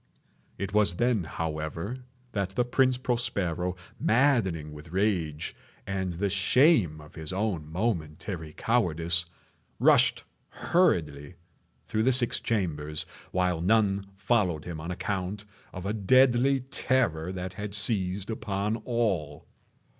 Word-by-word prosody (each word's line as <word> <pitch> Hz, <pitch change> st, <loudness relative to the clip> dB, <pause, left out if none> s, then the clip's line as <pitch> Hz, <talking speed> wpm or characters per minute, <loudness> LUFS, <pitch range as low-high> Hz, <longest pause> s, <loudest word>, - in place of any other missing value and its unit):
It 100 Hz, +1 st, -4 dB
was 105 Hz, -4 st, +3 dB
then, 120 Hz, -4 st, +1 dB
however, 80 Hz, +9 st, -4 dB, 0.3 s
that 100 Hz, -4 st, -1 dB
the 125 Hz, -, +2 dB
Prince 130 Hz, 0 st, +2 dB
Prospero, 95 Hz, -8 st, -1 dB, 0.2 s
maddening 105 Hz, -, +2 dB
with 75 Hz, +2 st, -11 dB
rage 90 Hz, -6 st, -1 dB, 0.3 s
and 95 Hz, -2 st, -2 dB
the 95 Hz, +4 st, -1 dB
shame 100 Hz, -, +4 dB
of 75 Hz, 0 st, -14 dB
his 80 Hz, -1 st, -6 dB
own 95 Hz, -6 st, -2 dB
momentary 85 Hz, -4 st, -3 dB
cowardice, 85 Hz, -7 st, +1 dB, 0.5 s
rushed -, -, +4 dB, 0.3 s
hurriedly 80 Hz, -, +1 dB, 0.5 s
through 110 Hz, -, 0 dB
the 130 Hz, +4 st, +4 dB
six 125 Hz, -2 st, +3 dB
chambers, 75 Hz, -8 st, -1 dB, 0.3 s
while 90 Hz, -2 st, 0 dB
none 100 Hz, 0 st, +2 dB
followed 95 Hz, -6 st, +1 dB
him 85 Hz, -3 st, -6 dB
on 85 Hz, -, -6 dB
account 95 Hz, +2 st, -3 dB, 0.3 s
of 90 Hz, 0 st, -7 dB
a 100 Hz, -, -1 dB
deadly 130 Hz, +5 st, +4 dB
terror 120 Hz, -10 st, 0 dB
that 90 Hz, 0 st, -5 dB
had 100 Hz, +1 st, -5 dB
seized 100 Hz, -1 st, -1 dB
upon 105 Hz, 0 st, -2 dB
all. 105 Hz, -, -2 dB
95 Hz, 120 wpm, -28 LUFS, 85-115 Hz, 0.5 s, shame